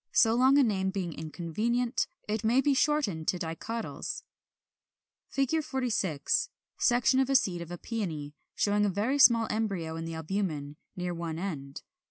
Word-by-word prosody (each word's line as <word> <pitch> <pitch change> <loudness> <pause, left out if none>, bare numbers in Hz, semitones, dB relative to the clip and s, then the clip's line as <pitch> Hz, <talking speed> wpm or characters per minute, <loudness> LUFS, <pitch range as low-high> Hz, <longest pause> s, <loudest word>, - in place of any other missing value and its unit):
So 225 -1 +5
long 260 +4 +5
a 285 - +6
name 190 -5 +1
being 190 -4 -3
inconvenient, 215 - -1 0.2
it 210 0 -2
may 235 +4 +3
be 280 +1 +3
shortened 280 - +1
into 180 - -5
DICOTYLS. 185 +7 -5 1.1
[Illustration: 275 +4 +2
Fig. - - -12
46. 215 - 0 0.3
Section 245 +2 +3
of 265 0 +2
a 270 - +2
seed 185 -9 +2
of 170 - -7
a 175 - -5
Peony, 165 -10 -4 0.2
showing 205 0 +2
a 205 - +3
very 220 +9 0
small 230 -4 +7
embryo 195 -7 -2
in 165 - -4
the 165 0 -5
albumen, 160 -4 -3 0.2
near 180 -1 -3
one 165 -2 -4
end. 145 -7 -5
200 Hz, 165 wpm, -29 LUFS, 165-240 Hz, 1.1 s, small